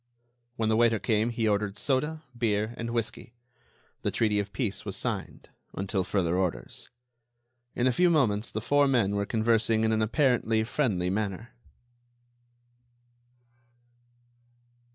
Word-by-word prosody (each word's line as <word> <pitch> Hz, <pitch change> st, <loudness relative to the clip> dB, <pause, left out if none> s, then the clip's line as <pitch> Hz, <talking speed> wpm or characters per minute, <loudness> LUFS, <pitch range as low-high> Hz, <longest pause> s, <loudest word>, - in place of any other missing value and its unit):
When 110 Hz, -3 st, 0 dB
the 110 Hz, -, +3 dB
waiter 115 Hz, 0 st, +4 dB
came 110 Hz, +1 st, +1 dB
he 115 Hz, -1 st, -1 dB
ordered 105 Hz, -1 st, 0 dB
soda, 150 Hz, +5 st, -1 dB
beer 110 Hz, -1 st, 0 dB
and 115 Hz, 0 st, -5 dB
whisky. 115 Hz, 0 st, -4 dB, 0.7 s
The -, -, 0 dB
treaty 105 Hz, -2 st, +1 dB
of 100 Hz, -1 st, -3 dB
peace 110 Hz, -8 st, -3 dB
was -, -, -5 dB
signed—until 95 Hz, 0 st, -4 dB
further 90 Hz, -3 st, 0 dB
orders. 90 Hz, -2 st, -3 dB, 0.9 s
In 120 Hz, -, 0 dB
a 130 Hz, -, +4 dB
few 180 Hz, +8 st, +3 dB
moments 120 Hz, -9 st, +2 dB
the 110 Hz, -, -4 dB
four 145 Hz, +5 st, +3 dB
men 115 Hz, -7 st, +2 dB
were 100 Hz, 0 st, -1 dB
conversing 110 Hz, -1 st, +2 dB
in 110 Hz, -, +2 dB
an 110 Hz, 0 st, +1 dB
apparently 115 Hz, -2 st, +2 dB
friendly 110 Hz, -8 st, 0 dB
manner. 105 Hz, +3 st, -3 dB
110 Hz, 130 wpm, -28 LUFS, 105-120 Hz, 0.9 s, waiter